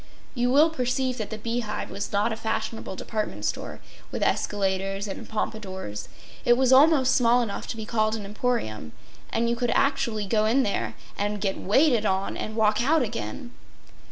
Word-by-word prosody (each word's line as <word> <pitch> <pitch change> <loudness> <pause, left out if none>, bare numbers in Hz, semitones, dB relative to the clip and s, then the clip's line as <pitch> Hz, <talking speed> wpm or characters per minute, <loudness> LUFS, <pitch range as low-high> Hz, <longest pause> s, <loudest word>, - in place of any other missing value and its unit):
You 245 -1 +1
will 305 +4 +5
perceive 255 -2 -1
that 215 - -3
the 220 - -5
Bee 230 +2 -2
Hive 215 -3 -4
was 200 0 -4
not 210 +3 +1
a - - -2
fashionable 220 -2 -3
department 210 - -4
store, - - -3 0.3
with - - -2
escalators 195 0 0
and 195 - -7
pompadours. 190 - -4 0.3
It 240 0 +5
was 260 0 +4
almost 275 -1 +6
small 245 0 +4
enough 210 -4 -5
to - - -5
be 220 - -5
called 215 -1 +1
an 210 -2 -6
emporium; 200 - -2 0.4
and 235 +1 0
you 235 - +1
could 240 0 -1
actually 270 -7 +1
go 215 +2 +2
in 260 +5 +3
there 115 - -2 0.2
and 205 +1 -1
get 195 -1 -1
waited 235 0 +3
on 190 +1 -1
and 215 - -5
walk 215 0 +3
out 305 +2 +3
again. 225 - -5
220 Hz, 180 wpm, -26 LUFS, 200-245 Hz, 0.4 s, almost